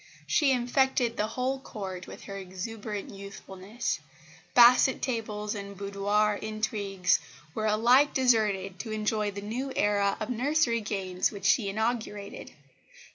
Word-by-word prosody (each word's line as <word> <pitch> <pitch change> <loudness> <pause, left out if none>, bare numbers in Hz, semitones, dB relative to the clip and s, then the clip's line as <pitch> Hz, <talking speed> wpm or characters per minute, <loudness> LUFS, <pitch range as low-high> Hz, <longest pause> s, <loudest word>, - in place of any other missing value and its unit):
She 295 -4 +3
infected 250 -1 +1
the 210 - 0
whole 255 +4 -2
Court 190 -8 -7
with - - -10
her 200 - -7
exuberant 200 +2 -6
youthfulness. 200 +2 -5 0.6
Basset 250 +2 +7
tables 210 -4 -3
and 200 -1 -7
boudoir 205 +1 +1
intrigues 210 -3 0 0.3
were 215 0 -1
alike 240 +7 +5
deserted 210 -7 +1
to 230 - -5
enjoy 215 -1 0
the 200 0 -6
new 245 +6 -4
era 205 -1 +2
of 215 +2 -3
nursery 250 -1 +1
games 190 -3 -1
which 200 -2 -8
she 200 0 +3
inaugurated. 215 -1 -3
215 Hz, 130 wpm, -28 LUFS, 200-235 Hz, 0.6 s, Basset